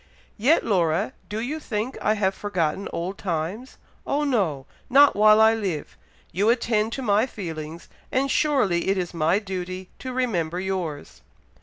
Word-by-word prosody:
Yet, 275 +10 +3
Laura, 165 - +1 0.2
do 210 - -3
you 275 +7 -3
think 230 -2 -3
I 215 - +2
have 195 -2 +1
forgotten 190 -2 -2
old 180 +4 -4
times! 185 +8 -4 0.3
Oh, 290 +1 +1
no! 190 - 0 0.2
not 280 +2 +6
while 215 +1 +6
I 220 0 +6
live. 190 -9 -3 0.4
You 200 +5 +1
attend 230 -2 +1
to 270 - -4
my 215 +2 +3
feelings, 165 -6 -7 0.2
and 270 +1 +1
surely 230 - +2
it 195 0 +2
is 180 -2 -3
my 165 +2 +2
duty 185 -2 -5
to 260 - -5
remember 180 -10 -1
yours." 185 -6 -4
200 Hz, 155 wpm, -24 LUFS, 175-230 Hz, 0.4 s, not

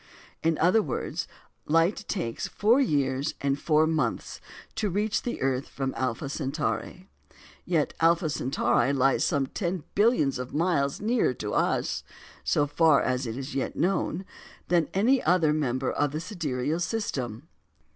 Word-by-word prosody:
In 160 -1 +1
other 185 +7 +4
words, 145 - -3 0.4
light 165 +7 +2
takes 145 - -3
four 230 +6 +3
years 140 - 0
and 140 0 0
four 155 0 +3
months 160 -1 -2 0.3
to 215 -2 -1
reach 205 +3 0
the 240 - -4
earth 135 0 0
from 135 -1 -3
Alpha 130 +2 -2
Centauri; 150 +6 -3 0.6
yet 165 -4 +1
Alpha 165 0 +3
Centauri 140 -1 +1
lies 135 0 +3
some 140 -2 +1
ten 175 +3 -3
billions 205 - +2
of 125 +2 -6
miles 150 -4 +1
nearer 220 - +1
to 105 -2 -4
us - - 0 0.4
(so 145 - +2
far 150 0 +4
as 130 0 -1
is 130 +5 -5
yet 135 - -2
known) 185 0 0 0.4
than 170 -3 +2
any 245 +7 +3
other 165 -2 +3
member 130 -4 0
of 145 -1 0
the 155 - -2
sidereal 160 - -2
system! 145 - -3
155 Hz, 145 wpm, -27 LUFS, 135-180 Hz, 0.6 s, other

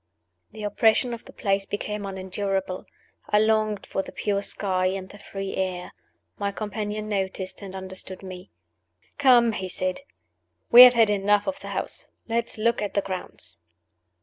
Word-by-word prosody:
The 215 0 -9
oppression 220 +4 +3
of 235 - -8
the - - -12
place 195 -1 -1
became 205 0 -4
unendurable. 190 0 -3 0.4
I 210 - +4
longed 215 -1 +2
for 195 - -2
the - - -10
pure 200 -1 -1
sky 185 -2 0
and 190 0 -3
the 205 - -13
free 195 -1 -5
air. 185 -1 -2 0.5
My 200 -1 -1
companion 210 0 -4
noticed 190 -2 -3
and 195 -1 -8
understood 190 0 -5
me. 185 0 -9 0.7
"Come," 245 -4 +6
he 190 -3 -4
said. 185 +6 -2 0.7
"We 240 - +12
have 250 0 +6
had 225 -2 +5
enough 205 0 +2
of 285 0 -2
the - - -9
house. - - -3 0.2
Let 230 0 0
us - - -8
look 230 +1 +1
at 205 - -3
the 200 - +3
grounds." 180 - -5
200 Hz, 165 wpm, -25 LUFS, 190-215 Hz, 0.7 s, We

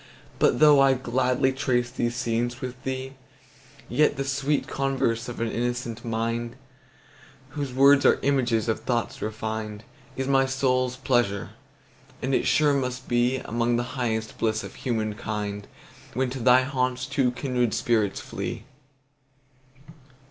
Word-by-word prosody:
But 120 - +3
though 150 -2 +7
I'll 135 -1 +5
gladly 130 +1 +1
trace 125 -2 0
these 120 0 -2
scenes 120 0 -1
with 125 -1 -6
thee, 130 0 -4 0.7
Yet 150 -2 +2
the 135 - -1
sweet 140 +2 0
converse 130 -3 -1
of 120 - -7
an 115 -1 -1
innocent 120 -1 -3
mind, 115 +1 -2 0.9
Whose 140 -1 -4
words 140 +2 +5
are - - +5
images 125 -6 +1
of 110 - 0
thoughts 120 -2 -2
refin'd, 110 0 -4 0.3
Is 135 0 -2
my 135 -1 +3
soul's 130 -1 +1
pleasure; 120 -7 0 0.7
and 135 +1 -2
it - - +2
sure 150 -1 +4
must 130 -2 -2
beAlmost 120 -1 +1
the 120 - 0
highest 110 -4 -2
bliss 110 0 0
of - - -8
human 110 -4 -2
kind, 105 -1 -4 0.5
When 130 0 0
to 135 - -5
thy 125 +1 +5
haunts 130 -2 -1
two 130 0 +1
kindred 125 -3 -1
spirits 110 -4 +1
flee. - - -5
125 Hz, 140 wpm, -25 LUFS, 115-130 Hz, 0.9 s, though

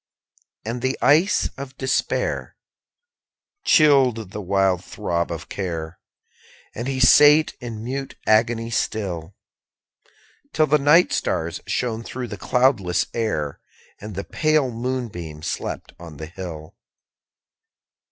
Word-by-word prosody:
6. 110 - -3
And 120 +1 -5
the 130 +1 -1
ice 160 +8 +4
of 135 -1 -8
despair 130 0 -1 1.1
Chilled 130 - +4
the 105 - -5
wild 95 -1 +1
throb 85 0 -2
of 85 -1 -6
care, 85 -4 -5 0.7
And 120 +3 -5
he 135 -1 -2
sate 150 +4 +6
in 115 -3 -6
mute 135 +3 -5
agony 115 +1 +2
still; 95 -6 -3 1.2
Till 155 - +3
the 150 +1 +3
night 150 +6 +5
stars 85 0 -2
shone 115 -3 -1
through 125 +1 -6
the 105 - -6
cloudless 120 -9 +2
air, 80 -11 -2 0.4
_35 - - -8
And 105 - -8
the 100 - -3
pale 155 -4 +1
moonbeam 115 -11 -5
slept - - -4
on 85 -3 -10
the 80 - -6
hill. 80 -2 -8
115 Hz, 125 wpm, -22 LUFS, 90-130 Hz, 1.2 s, sate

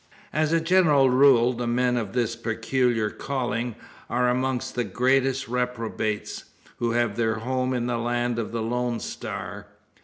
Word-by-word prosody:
As 155 0 +1
a 165 - +4
general 160 -6 +4
rule, 125 -2 +5
the 120 0 -3
men 125 +1 +1
of 110 -5 -3
this 120 -2 0
peculiar 115 -1 0
calling 120 -4 -3 0.3
are 125 +1 +2
amongst 130 0 -1
the 120 - 0
greatest 130 +5 +1
reprobates, 115 -3 -3 0.3
who 115 -1 0
have 120 -3 0
their 110 -1 +1
home 130 +3 -1
in 125 -2 -1
the 120 -1 -1
land 120 0 -1
of 110 - -3
the 115 -1 -2
"Lone 120 0 -1
Star." - - -6
125 Hz, 155 wpm, -25 LUFS, 115-130 Hz, 0.3 s, rule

